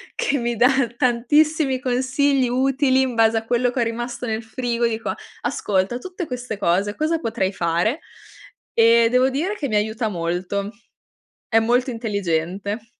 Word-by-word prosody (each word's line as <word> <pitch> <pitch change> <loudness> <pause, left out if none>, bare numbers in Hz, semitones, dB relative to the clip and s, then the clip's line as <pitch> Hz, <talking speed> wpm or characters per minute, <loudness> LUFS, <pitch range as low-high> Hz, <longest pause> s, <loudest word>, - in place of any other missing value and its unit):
che 285 - 0
mi 235 -1 -1
dà 245 +3 +5 0.3
tantissimi 265 +3 +2
consigli 260 +1 +1
utili 265 +1 +2
in 260 -2 0
base 225 0 +4
a 225 - -3
quello 245 +1 +1
che 250 - -1
è - - +4
rimasto 240 +2 -4
nel 220 -1 -2
frigo, 235 +1 -1
dico: 225 0 -3 0.3
"Ascolta, 195 +3 -1
tutte 360 +6 -6
queste 245 -4 -5
cose, 200 +2 0
cosa 320 +2 0
potrei 220 - -1
fare?". 175 - 0 0.7
E 230 0 +5
devo 255 +1 +4
dire 335 +10 -2
che 290 -8 -3
mi 215 - -2
aiuta 220 +2 0
molto. 180 +2 -2 0.8
È 225 - +4
molto 245 +3 +1
intelligente. 200 -1 -2
235 Hz, 150 wpm, -22 LUFS, 215-260 Hz, 0.8 s, dà